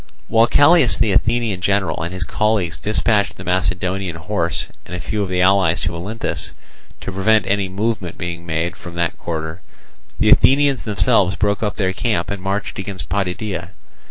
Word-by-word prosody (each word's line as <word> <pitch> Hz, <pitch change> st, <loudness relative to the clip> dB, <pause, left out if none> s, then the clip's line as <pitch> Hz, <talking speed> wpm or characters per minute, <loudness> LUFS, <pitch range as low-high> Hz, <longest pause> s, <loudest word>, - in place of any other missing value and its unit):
While 115 Hz, +1 st, +5 dB
Callias 145 Hz, -, +5 dB
the 105 Hz, -, +2 dB
Athenian 115 Hz, -1 st, +1 dB
general 95 Hz, -4 st, 0 dB
and 85 Hz, +2 st, -3 dB
his 95 Hz, -1 st, -3 dB
colleagues 95 Hz, -2 st, 0 dB
dispatched 105 Hz, -1 st, +1 dB
the 90 Hz, -, -8 dB
Macedonian 90 Hz, 0 st, -1 dB
horse 85 Hz, -2 st, -2 dB, 0.2 s
and 90 Hz, -, -6 dB
a -, -, -5 dB
few 105 Hz, +3 st, -3 dB
of 100 Hz, -, -2 dB
the 90 Hz, -1 st, 0 dB
allies 95 Hz, -3 st, +3 dB
to 85 Hz, 0 st, -2 dB
Olynthus, 100 Hz, +7 st, -4 dB, 0.5 s
to -, -, -5 dB
prevent 100 Hz, +2 st, +2 dB
any 100 Hz, -1 st, 0 dB
movement 100 Hz, -2 st, -2 dB
being 85 Hz, 0 st, -5 dB
made 85 Hz, +1 st, -2 dB
from 85 Hz, -1 st, -10 dB
that 85 Hz, -1 st, -1 dB
quarter, 80 Hz, +1 st, -5 dB, 0.6 s
the -, -, +4 dB
Athenians 140 Hz, 0 st, +4 dB
themselves 95 Hz, -2 st, +2 dB
broke 105 Hz, -1 st, 0 dB
up 105 Hz, -2 st, -1 dB
their 95 Hz, -2 st, 0 dB
camp 110 Hz, -1 st, -1 dB
and 100 Hz, -2 st, -4 dB
marched 100 Hz, +2 st, -3 dB
against 95 Hz, -7 st, -6 dB
Potidæa. 100 Hz, 0 st, -2 dB
95 Hz, 170 wpm, -19 LUFS, 85-105 Hz, 0.6 s, While